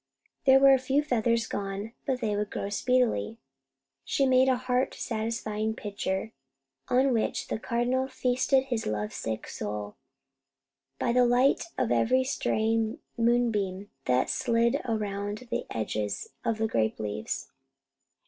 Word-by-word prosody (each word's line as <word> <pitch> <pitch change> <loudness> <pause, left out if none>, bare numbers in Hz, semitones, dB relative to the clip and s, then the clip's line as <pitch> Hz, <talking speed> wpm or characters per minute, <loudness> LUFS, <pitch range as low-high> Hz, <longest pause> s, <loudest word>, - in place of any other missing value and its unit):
There 265 0 +7
were 275 0 +7
a 265 - +4
few 270 +3 +1
feathers 230 -4 +1
gone; 200 +1 -4 0.2
but 260 -2 0
they 215 -3 0
would 205 0 -1
grow 200 - -4
speedily. 230 - +1 0.7
She 275 - +1
made 260 0 +5
a 260 - +4
heart 255 +1 0
satisfying 220 -1 -2
picture, 200 0 -3 0.6
on 260 +1 +3
which 225 - -1
the - - -2
Cardinal 245 +3 0
feasted 260 +1 +1
his 240 -4 -3
love 105 0 -2
sick 110 -1 -4
soul, 105 0 -5 1.0
by 235 - 0
the 250 0 +5
light 250 +3 +3
of 240 - 0
every 255 +3 +3
straying 225 -3 0 0.2
moonbeam 220 -5 +1
that 125 0 +2
slid 235 -1 +1
around 210 0 -3
the - - -2
edges 105 -2 -3
of 230 - 0
the 220 0 +1
grape 110 - 0
leaves. 105 0 -4
225 Hz, 140 wpm, -28 LUFS, 200-255 Hz, 1.0 s, There